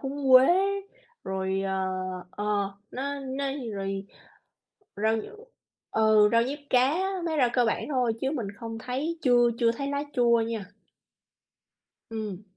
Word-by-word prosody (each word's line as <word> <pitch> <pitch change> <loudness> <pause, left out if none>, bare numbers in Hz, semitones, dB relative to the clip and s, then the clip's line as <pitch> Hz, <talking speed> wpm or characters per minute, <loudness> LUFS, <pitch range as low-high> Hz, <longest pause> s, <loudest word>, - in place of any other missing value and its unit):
húng 275 0 -2
quế, 255 +1 +9 0.8
rồi, 190 0 -1
ờ 190 0 -1 0.6
ờ, 205 - -5 0.5
nó 280 +2 -4
nó 270 +1 -4 0.3
rồi 195 0 -4 0.9
rau 220 +2 +2
nh 220 - -3 0.7
ừ, 215 -1 +5
rau 230 - +5
diếp 285 +4 -4
cá, 260 +6 +3 0.3
mấy 320 -2 -1
rau 250 -3 +4
cơ 245 - +3
bản 225 - 0
thôi 250 -4 +1
chứ 265 - 0
mình 245 -9 -3
không 225 0 -6
thấy 275 +8 -3
chưa 240 -2 +5
chưa 230 -1 +3
thấy 275 +4 -4
lá 285 0 -1
chua 235 -1 +4
nha. 220 -4 -4 1.4
Ừm. 215 -4 -5
235 Hz, 145 wpm, -27 LUFS, 215-270 Hz, 1.4 s, quế